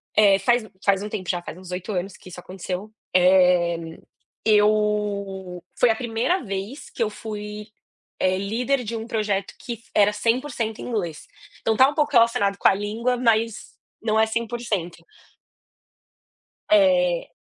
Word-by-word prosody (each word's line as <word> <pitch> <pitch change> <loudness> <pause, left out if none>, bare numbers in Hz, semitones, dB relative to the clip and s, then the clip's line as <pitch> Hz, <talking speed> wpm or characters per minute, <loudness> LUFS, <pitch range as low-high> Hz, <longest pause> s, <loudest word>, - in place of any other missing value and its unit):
eh, 200 -2 +5
faz 240 -2 +2
um - - -15 0.2
faz 200 0 +3
um 210 - -5
tempo 190 -4 -5
já, 175 -1 0
faz 175 - -9
uns 185 -1 -11
8 185 +3 -4
anos 185 +1 -3
que 185 - -14
isso 180 - -9
aconteceu. 185 +3 -6 0.2
Eh, 180 -2 +5 0.7
eu 205 -4 +1 0.2
foi 245 - +5
a - - 0
1º 240 +9 -1
vez 200 +7 -6
que - - -8
eu 215 - 0
fui, 210 0 -7 0.5
eh, 185 0 +2
líder 245 +7 -1
de 230 +1 -4
um 225 +1 -6
projeto 205 -4 -1
que 235 -2 -6
era 210 0 +5
100% 230 0 -1
em - - -6
inglês. 175 -10 -3 0.4
Então 225 - +1
está 260 +3 +7
um - - -5
pouco 300 -2 +1
relacionado 230 -4 +3
com - - +3
a - - +6
língua, 220 +5 -1
mas 230 -2 +1 0.3
não 220 0 +1
é 220 - +5
100%. 225 -6 -3 1.7
É 180 -4 +3
210 Hz, 160 wpm, -23 LUFS, 190-230 Hz, 1.7 s, está